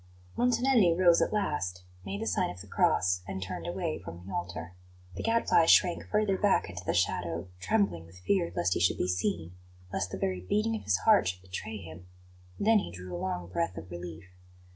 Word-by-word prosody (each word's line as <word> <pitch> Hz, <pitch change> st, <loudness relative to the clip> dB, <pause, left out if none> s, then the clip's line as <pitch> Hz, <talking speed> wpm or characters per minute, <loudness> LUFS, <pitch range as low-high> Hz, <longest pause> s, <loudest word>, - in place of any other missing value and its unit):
Montanelli 240 Hz, -6 st, +3 dB
rose 175 Hz, -2 st, +5 dB
at -, -, +1 dB
last, 120 Hz, -, -2 dB, 0.2 s
made 100 Hz, +1 st, -4 dB
the -, -, -3 dB
sign -, -, +1 dB
of 90 Hz, -, -8 dB
the 95 Hz, -, -9 dB
cross, 90 Hz, -2 st, +2 dB
and 95 Hz, 0 st, -4 dB
turned 95 Hz, -, -5 dB
away 175 Hz, -2 st, -2 dB
from 85 Hz, 0 st, -10 dB
the 95 Hz, -, -8 dB
altar. 85 Hz, 0 st, -4 dB, 0.4 s
The 90 Hz, -, -5 dB
Gadfly 225 Hz, -7 st, +3 dB
shrank 175 Hz, 0 st, +4 dB
further 210 Hz, -3 st, +1 dB
back 205 Hz, -2 st, +3 dB
into 90 Hz, 0 st, -7 dB
the -, -, -1 dB
shadow, 85 Hz, -1 st, -1 dB
trembling 90 Hz, -2 st, 0 dB
with 85 Hz, +2 st, -16 dB
fear 170 Hz, -, 0 dB
lest 85 Hz, +1 st, +1 dB
he -, -, -1 dB
should 90 Hz, -, +2 dB
be -, -, 0 dB
seen, 85 Hz, -2 st, -1 dB, 0.4 s
lest 90 Hz, -, -1 dB
the -, -, -5 dB
very 95 Hz, -1 st, -1 dB
beating 215 Hz, -, 0 dB
of 220 Hz, -, -6 dB
his -, -, +3 dB
heart 215 Hz, -, +6 dB
should 90 Hz, 0 st, -3 dB
betray 100 Hz, +4 st, -6 dB
him; 85 Hz, -1 st, -11 dB, 0.5 s
then 220 Hz, +1 st, +5 dB
he -, -, -5 dB
drew 90 Hz, +1 st, -8 dB
a 85 Hz, -, -5 dB
long 90 Hz, -2 st, -3 dB
breath 90 Hz, 0 st, -2 dB
of 85 Hz, +3 st, -8 dB
relief. 85 Hz, -1 st, -7 dB
90 Hz, 205 wpm, -30 LUFS, -, 0.5 s, heart